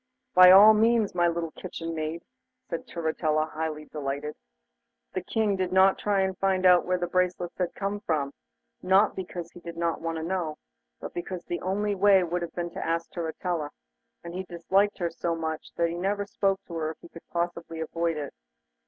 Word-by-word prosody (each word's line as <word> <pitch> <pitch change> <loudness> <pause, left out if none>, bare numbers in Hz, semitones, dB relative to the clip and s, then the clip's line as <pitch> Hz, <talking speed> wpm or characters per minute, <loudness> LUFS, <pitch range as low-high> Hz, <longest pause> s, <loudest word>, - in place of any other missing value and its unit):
'By 180 0 +9
all 200 +4 +10
means, 225 -1 +3
my 175 -1 +3
little 170 -1 -2
kitchen 165 -2 -6
maid,' 160 +1 -4 0.4
said 165 - -5
Turritella, 155 -2 0
highly 155 -1 -4
delighted. 145 0 -4 0.8
The 185 - -2
King 210 +2 0
did 185 -1 -1
not 190 +1 +5
try 200 -2 +2
to 190 - -2
find 190 0 0
out 180 -1 +6
where 180 0 +2
the 175 - -1
bracelets 180 0 -1
had 180 -2 -1
come 200 +1 -2
from, 150 -8 -1 0.5
not 190 +3 +4
because 175 -2 -6
he - - -12
did 170 -1 -9
not 170 -1 -1
want 165 0 -2
to 160 - -4
know, 170 -3 -2 0.4
but - - -7
because 175 0 -5
the 175 - -4
only 205 +3 0
way 195 -1 +5
would 175 +1 -2
have 170 - -6
been 175 -1 -3
to - - -5
ask 165 0 -2
Turritella, 165 -2 -3 0.5
and 170 0 -7
he 185 - -3
disliked 190 +4 +1
her 170 -2 -1
so 170 0 -2
much 160 -1 -4
that 170 0 +1
he 170 - -4
never 200 +3 -1
spoke 195 -1 0
to 170 - -10
her 155 -1 -1
if - - -32
he - - -12
could 165 - -13
possibly 170 -1 -3
avoid 165 0 -1
it. 145 -2 -5
175 Hz, 195 wpm, -27 LUFS, 165-190 Hz, 0.8 s, all